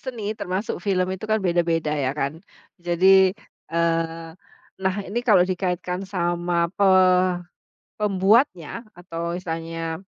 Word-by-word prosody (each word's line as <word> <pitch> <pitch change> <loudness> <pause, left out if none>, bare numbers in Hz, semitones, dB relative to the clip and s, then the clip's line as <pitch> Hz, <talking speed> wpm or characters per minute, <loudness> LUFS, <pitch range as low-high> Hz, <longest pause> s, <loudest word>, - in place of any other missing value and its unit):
seni, 250 -4 -6 0.2
termasuk 190 +4 -3
film 185 -2 +2
itu, 190 - -8
kan, 220 0 +2
beda-beda, 170 -3 +1
ya, 130 - +1
kan? 140 0 -1 0.5
Jadi, 175 +2 +2 0.7
eee, 165 +2 -3
nah, 190 -1 +1
ini 215 +5 -3
kalau 185 -4 +6
dikaitkan 180 0 -2
sama 175 -1 -1 0.3
pe - - +6 1.2
pembuatnya 195 - +2 0.3
atau 170 -2 -8 0.2
misalnya 165 -2 -4
175 Hz, 115 wpm, -23 LUFS, 165-190 Hz, 1.2 s, kalau